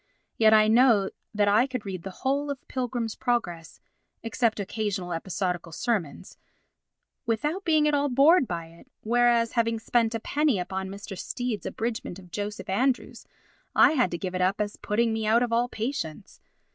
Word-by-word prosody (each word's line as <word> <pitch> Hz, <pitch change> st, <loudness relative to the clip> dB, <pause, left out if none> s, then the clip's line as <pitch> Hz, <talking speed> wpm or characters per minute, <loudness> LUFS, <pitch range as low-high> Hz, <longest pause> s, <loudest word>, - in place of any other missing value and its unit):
Yet 220 Hz, -1 st, +5 dB
I 215 Hz, 0 st, +6 dB
know 225 Hz, -3 st, +4 dB, 0.2 s
that 210 Hz, -1 st, +1 dB
I 215 Hz, +6 st, +4 dB
could 255 Hz, -5 st, -5 dB
read 190 Hz, -3 st, -5 dB
the 195 Hz, -, -6 dB, 0.2 s
whole 285 Hz, +2 st, +1 dB
of 280 Hz, -2 st, -3 dB
The -, -, -39 dB
Pilgrim's 245 Hz, -3 st, -3 dB
Progress 180 Hz, -10 st, -2 dB, 0.4 s
(except 230 Hz, -1 st, 0 dB
occasional 200 Hz, -3 st, -3 dB
episodical 175 Hz, 0 st, -3 dB
sermons) 190 Hz, -, -3 dB, 0.9 s
without 295 Hz, -, -1 dB
being 310 Hz, -3 st, +3 dB
at 300 Hz, -, +1 dB
all 285 Hz, 0 st, +2 dB
bored 275 Hz, +3 st, +5 dB
by 170 Hz, -1 st, -4 dB
it, 170 Hz, +9 st, -18 dB, 0.2 s
whereas, 235 Hz, 0 st, +3 dB
having 230 Hz, -1 st, +1 dB
spent 230 Hz, 0 st, +1 dB
a -, -, -1 dB
penny 290 Hz, 0 st, +1 dB
upon 190 Hz, +1 st, -4 dB
Mr. 200 Hz, 0 st, -8 dB
Stead's 245 Hz, +3 st, -4 dB
abridgement 225 Hz, -6 st, -4 dB
of 180 Hz, -2 st, -15 dB
Joseph 205 Hz, +2 st, -5 dB
Andrews, 250 Hz, +7 st, -1 dB, 0.5 s
I -, -, +7 dB
had 255 Hz, -10 st, +2 dB
to 175 Hz, -, -4 dB
give 185 Hz, +1 st, -5 dB
it 185 Hz, -, -2 dB
up 185 Hz, +2 st, +1 dB
as 210 Hz, 0 st, -2 dB
putting 225 Hz, +2 st, 0 dB
me 220 Hz, -1 st, -2 dB
out 230 Hz, +3 st, +4 dB
of 235 Hz, -1 st, -2 dB
all 240 Hz, +1 st, +2 dB
patience. 220 Hz, -, -5 dB
225 Hz, 175 wpm, -26 LUFS, 195-245 Hz, 0.9 s, I